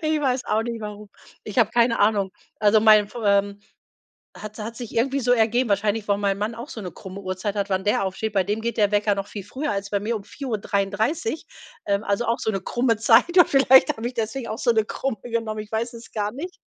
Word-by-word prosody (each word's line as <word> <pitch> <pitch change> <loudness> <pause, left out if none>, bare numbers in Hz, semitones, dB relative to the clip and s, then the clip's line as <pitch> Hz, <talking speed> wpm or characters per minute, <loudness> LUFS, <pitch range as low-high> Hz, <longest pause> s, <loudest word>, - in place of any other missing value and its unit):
Ich 310 -1 +1
weiß 260 -3 0
auch 215 +1 +1
nicht, 230 -1 -5
warum. 210 -1 -8 0.3
Ich 210 +3 -4
habe 225 -3 +4
keine 235 0 +2
Ahnung. 205 -2 +2 0.3
Also, 210 +1 +5
mein 215 -1 +6
F 210 - -14
ähm, 200 0 +2 0.8
hat 215 +1 -9
hat 225 +2 -6
sich 240 -2 -8
irgendwie 270 +4 +1
so 245 -1 +2
ergeben 240 +1 +2
wahrscheinlich, 205 +1 0
weil 200 0 +2
mein 200 -1 0
Mann 210 +3 -2
auch 235 +5 -8
so 225 - -7
'ne 180 - -5
krumme 190 +1 -9
Uhrzeit 190 +1 -3
hat, 200 0 -2
wann 190 0 0
der 205 -1 +1
aufsteht. 195 +3 -3
Bei 195 -2 +2
dem 210 +3 -2
geht 235 +1 -3
der 205 -2 +3
Wecker 205 0 +2
noch 195 0 -4
viel 205 -2 -8
früher 265 +9 -4
als 200 -1 -3
bei 200 - 0
mir, 225 +3 -2
um 205 - -8
4:33, 220 - -2 0.4
ähm, 200 +1 0
also, 205 +4 0
auch 230 - +1
so' - - 0
ne 195 - -2
krumme 240 +4 0
Zeit 240 +11 +4
und 355 - +7
vielleicht 265 -1 +5
habe 225 +1 -4
ich 245 - -3
deswegen 230 +2 -3
auch 220 - -4
so 240 - +2
'ne 220 -1 +2
krumme 265 +2 -3
genommen, 225 -2 -3
ich 210 0 -10
weiß 235 +2 -2
es 230 0 -12
gar 210 -2 -1
nicht. 345 +8 -7
220 Hz, 240 wpm, -23 LUFS, 205-235 Hz, 0.8 s, und